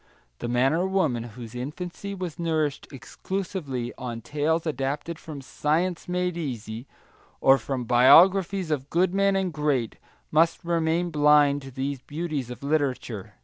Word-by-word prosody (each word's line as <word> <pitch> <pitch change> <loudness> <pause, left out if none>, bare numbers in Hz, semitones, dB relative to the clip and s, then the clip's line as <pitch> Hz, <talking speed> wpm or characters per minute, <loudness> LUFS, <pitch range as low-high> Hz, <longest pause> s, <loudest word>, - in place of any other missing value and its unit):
The - - -4
man 125 +4 +2
or 175 +3 +1
woman 160 -11 +1
whose 115 0 -10
infancy 175 +10 -6
was 180 -4 -6
nourished 155 -4 -1
exclusively 140 - -4
on 120 -2 -5
tales 150 +6 -1
adapted 150 +3 -3
from 150 -4 -8
science 165 +6 -1
made 180 0 -1
easy, 120 -6 -5 0.5
or 135 0 +5
from 130 +2 -3
biographies 175 - +5
of 140 -2 -2
good 180 +2 +2
men 195 0 +3
and 190 -3 0
great, 140 -6 -1 0.3
must 165 +2 +3
remain 170 +1 0
blind 150 -1 +4
to 135 - -9
these 135 0 -4
beauties 150 -4 -4
of 125 +2 -9
literature. 135 -8 -2
150 Hz, 145 wpm, -26 LUFS, 130-170 Hz, 0.5 s, or